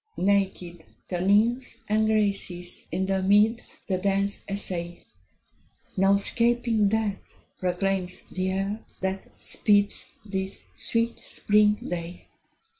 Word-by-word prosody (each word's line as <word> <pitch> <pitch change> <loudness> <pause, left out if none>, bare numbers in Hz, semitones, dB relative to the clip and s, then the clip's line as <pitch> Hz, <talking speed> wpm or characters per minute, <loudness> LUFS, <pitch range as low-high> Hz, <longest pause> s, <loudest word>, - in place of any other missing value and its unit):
Naked 190 -3 0 0.3
the 180 -2 -2
Nymphs 230 +5 +2
and 215 +1 +2
Graces 200 -5 -1
in 190 - 0
the 190 0 0
meads 210 +4 +2
The 185 -2 -1
dance 200 +1 0
essay: 175 -3 -2 0.9
"No 195 0 +4
'scaping 230 0 +2
death" 215 -2 -2 0.2
proclaims 185 0 -1
the 185 - -4
year, 195 +3 -1 0.2
that 190 +1 -2
speeds 205 -1 +2 0.2
This 190 -1 -4
sweet 230 0 -1
spring 210 0 +3
day. 175 0 -6
200 Hz, 110 wpm, -26 LUFS, 185-210 Hz, 0.9 s, No